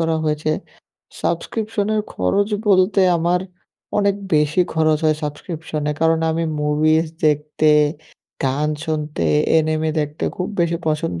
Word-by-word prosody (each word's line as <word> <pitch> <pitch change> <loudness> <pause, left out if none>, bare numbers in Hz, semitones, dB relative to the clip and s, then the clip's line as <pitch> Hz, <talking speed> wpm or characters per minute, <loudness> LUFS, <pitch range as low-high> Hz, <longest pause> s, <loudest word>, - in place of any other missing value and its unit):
করা 165 0 +1
হয়েছে। 150 0 0 0.7
সাবস্ক্রিপশনের 215 +3 -1
খরচ 200 - +1 0.2
বলতে 190 +1 +4 0.2
আমার 175 +2 +1 0.6
অনেক 200 -1 +2 0.2
বেশি 150 +3 +2
খরচ 155 -1 +3
হয় 155 -1 +3
সাবস্ক্রিপশনে, 150 0 -4
কারণ 165 0 +3
আমি 165 +1 -1 0.2
মুভিজ 155 +2 +2 0.2
দেখতে, 150 +1 +2 0.7
গান 140 +3 0 0.2
শুনতে, 150 - -2 0.3
এনিমে 155 0 0
দেখতে 150 +1 -3
খুব 180 - -2
বেশি 170 0 +1
পছন্দ 150 - -1
155 Hz, 120 wpm, -20 LUFS, 150-170 Hz, 0.7 s, বলতে